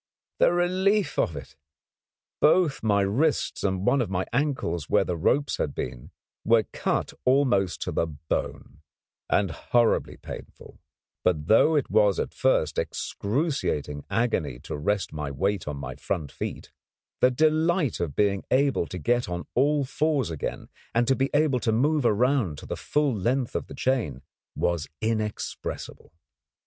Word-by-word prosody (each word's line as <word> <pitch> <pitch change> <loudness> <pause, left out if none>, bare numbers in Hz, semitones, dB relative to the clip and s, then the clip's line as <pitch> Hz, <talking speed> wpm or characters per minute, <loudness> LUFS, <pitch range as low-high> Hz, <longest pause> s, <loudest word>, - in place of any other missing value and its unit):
The - - +5
relief 185 +1 +1
of 80 - +1
it! 70 -2 -9 0.8
Both 155 -2 +3
my 105 -2 +2
wrists 130 +11 0
and 95 -1 0
one 140 - +3
of 115 - -2
my 95 0 -1
ankles 125 - -1
where - - +4
the 90 - -2
ropes 135 - +1
had - - -2
been - - -5 0.3
were 115 -1 +4
cut - - -1
almost 125 - +2
to - - -3
the 85 - 0
bone, 75 0 -5 0.5
and 100 -4 +2
horribly 120 +6 +1
painful; - - -10 0.4
but 80 -5 +1
though 115 - +5
it 145 - 0
was 105 -3 +4
at - - -3
first - - +1
excruciating 105 - -2
agony 115 - 0
to - - -6
rest 100 +7 -1
my 75 -2 -4
weight 95 +7 -1
on 75 -1 -3
my 65 -1 -5
front 80 -1 -4
feet, - - -6 0.5
the 125 - +5
delight 155 - +2
of 85 -5 -3
being 100 -2 +1
able 135 -8 +2
to 90 - -6
get 120 +6 0
on 85 0 -4
all 145 +2 +2
fours 145 - 0
again, 80 - -5 0.3
and 120 0 +3
to 135 - +4
be 135 +1 0
able 145 -3 +2
to 110 0 0
move 140 +4 +2
around 115 - +2
to - - -10
the - - -4
full 150 -3 0
length 120 +5 -1
of - - -2
the - - -9
chain, 110 - -1 0.3
was 85 -3 0
inexpressible. 110 -1 -4
110 Hz, 155 wpm, -26 LUFS, 85-140 Hz, 0.8 s, The